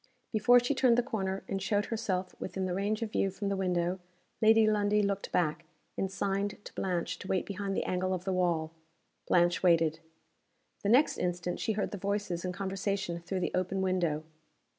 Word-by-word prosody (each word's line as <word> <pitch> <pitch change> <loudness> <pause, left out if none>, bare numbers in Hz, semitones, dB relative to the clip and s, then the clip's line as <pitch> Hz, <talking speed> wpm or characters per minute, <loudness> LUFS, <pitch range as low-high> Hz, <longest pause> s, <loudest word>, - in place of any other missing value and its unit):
Before 240 +3 +6
she 245 +4 0
turned 260 -3 +4
the 245 - +3
corner, 195 -6 -2
and 195 0 -2
showed 205 +1 +1
herself 190 -5 -2
within 190 0 -3
the 180 - -1
range 205 +4 -1
of 220 - -4
view 195 - +1
from 200 +1 -3
the 200 - 0
window 180 -1 0 0.4
Lady 220 0 +6
Lundie 210 -1 +2
looked 200 0 -2
back, 155 -4 0 0.3
and 195 - -2
signed 200 +1 -1
to - - -9
Blanche 180 -1 -2
to - - -8
wait 190 -2 0
behind 200 -1 -3
the - - +1
angle 185 +1 -1
of 185 -1 -2
the 190 - 0
wall. 170 -3 +1 0.6
Blanche 175 0 +3
waited. 165 -3 +3 0.8
The 200 - 0
next 255 +7 +4
instant 175 0 -2
she 220 - 0
heard 205 - -2
the 205 - -5
voices 200 -3 -2
in 180 - -2
conversation 195 -1 -2
through 185 +2 -3
the - - -1
open 185 +1 0
window. 175 -5 0
190 Hz, 190 wpm, -31 LUFS, 180-205 Hz, 0.8 s, Before